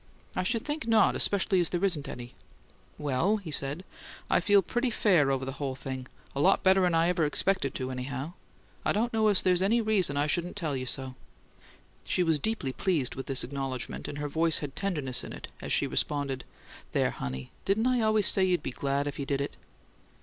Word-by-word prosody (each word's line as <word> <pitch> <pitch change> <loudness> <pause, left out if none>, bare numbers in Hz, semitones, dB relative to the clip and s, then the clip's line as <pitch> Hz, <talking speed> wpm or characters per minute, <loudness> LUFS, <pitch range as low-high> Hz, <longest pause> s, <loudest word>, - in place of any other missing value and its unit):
"I - - +1
should 225 +4 -1
think 300 -2 -3
not 225 -2 +4
especially 195 -1 +2
as 175 - +2
there 175 +2 0
isn't 165 -7 -1
any." 120 0 -8 0.6
"Well," 150 +9 +1
he 185 -7 -8
said, 140 +5 -1 0.5
"I - - +5
feel 200 +2 +4
pretty 240 +7 0
fair 180 -10 +3
over 135 -1 0
the 135 - -3
whole 135 -2 -2
thing 130 -1 -6 0.3
a 140 - 0
lot - - +4
better'n 190 -2 +4
I 165 +1 +3
ever 175 -2 +1
expected 150 -1 +1
to, 130 0 -3
anyhow. 130 +5 -5 0.5
I - - +1
don't 230 +3 0
know 220 -1 +3
as 205 -3 +4
there's 180 -1 +3
any 215 +5 +3
reason 200 -10 +1
I 145 - +2
shouldn't 175 +4 -1
tell 160 -8 -2
you 130 -1 -4
so." 130 +1 0 0.9
She 180 - +1
was 160 -3 +2
deeply 180 -9 -2
pleased 160 -9 0
with 135 - -7
this 135 -2 +1
acknowledgment, 135 -1 -4
and 145 - -6
her 145 0 -3
voice 160 +2 +3
had 145 -2 -5
tenderness 150 -11 -1
in - - -7
it - - -8
as - - -5
she - - +3
responded: 140 -3 -1 0.5
"There, - - +2
honey! 65 0 -6
Didn't 205 +4 +1
I 250 -1 +2
always 215 -2 +3
say 190 - +5
you'd 180 -4 +1
be - - -3
glad 140 +2 -1
if 145 0 -5
you 140 - -3
did 140 -1 0
it?" 140 - -3
160 Hz, 210 wpm, -29 LUFS, 135-195 Hz, 0.9 s, I